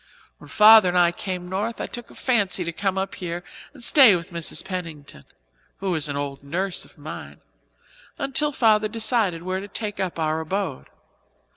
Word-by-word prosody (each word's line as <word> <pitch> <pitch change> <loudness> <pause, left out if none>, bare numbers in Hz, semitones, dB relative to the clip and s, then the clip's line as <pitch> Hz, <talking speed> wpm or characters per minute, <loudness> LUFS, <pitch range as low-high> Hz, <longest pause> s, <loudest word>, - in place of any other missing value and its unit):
When - - -14
Father 215 -2 +7
and 180 - 0
I 175 -1 +4
came 180 0 -5
north 205 +5 -3
I - - -2
took 240 -1 -8
a - - -16
fancy 200 -8 +1
to 170 - -3
come 190 +2 -1
here 175 -2 -5 0.3
and 270 -5 -13
stay 255 -6 +7
with 170 0 -6
Mrs. 170 -2 -3
Pennington 160 - -7 0.5
who 195 -2 -2
is 155 -2 0
an 140 - -3
old 140 -1 -5
nurse 180 +6 -2
of - - -18
mine - - -9 0.8
until 285 +2 +1
Father 220 -5 +3
decided 220 -6 0
where 185 +1 -2
to 200 - -8
take 205 0 -5
up 185 -3 -3
our 155 -1 -1
abode. 175 - -4
185 Hz, 175 wpm, -23 LUFS, 170-215 Hz, 0.8 s, Father